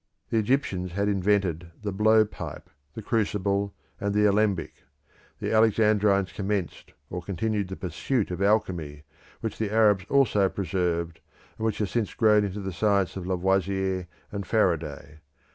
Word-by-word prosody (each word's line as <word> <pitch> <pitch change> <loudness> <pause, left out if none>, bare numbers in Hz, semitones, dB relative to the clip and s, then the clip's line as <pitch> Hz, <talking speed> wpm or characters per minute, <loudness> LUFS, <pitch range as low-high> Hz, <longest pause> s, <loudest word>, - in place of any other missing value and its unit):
The 115 - +3
Egyptians 100 -7 0
had 100 +2 0
invented 95 -4 +1
the 105 - -2
blow 110 +2 +4
pipe, - - -8 0.2
the 110 - -6
crucible, 100 -2 0 0.2
and 100 0 -1
the 105 0 +4
alembic; 100 -4 +1 0.6
the - - -2
Alexandrines 105 -3 +3
commenced 100 -2 -3 0.2
or 90 - -4
continued 100 +2 -2
the 95 - -6
pursuit 95 - -2
of 90 +1 -4
alchemy, 90 -8 0 0.4
which 110 -2 -4
the 110 -2 -1
Arabs 105 -4 +4
also 105 -8 +3
preserved, 85 -3 -2 0.4
and 110 - -2
which 110 - -1
has 105 -3 -2
since 115 -4 -1
grown 105 -2 +4
into 100 0 -3
the 95 -1 -4
science 100 0 +1
of 95 -2 -5
Lavoisier 95 0 0 0.2
and 100 -2 -5
Faraday. 80 -8 -1
100 Hz, 145 wpm, -26 LUFS, 90-105 Hz, 0.6 s, blow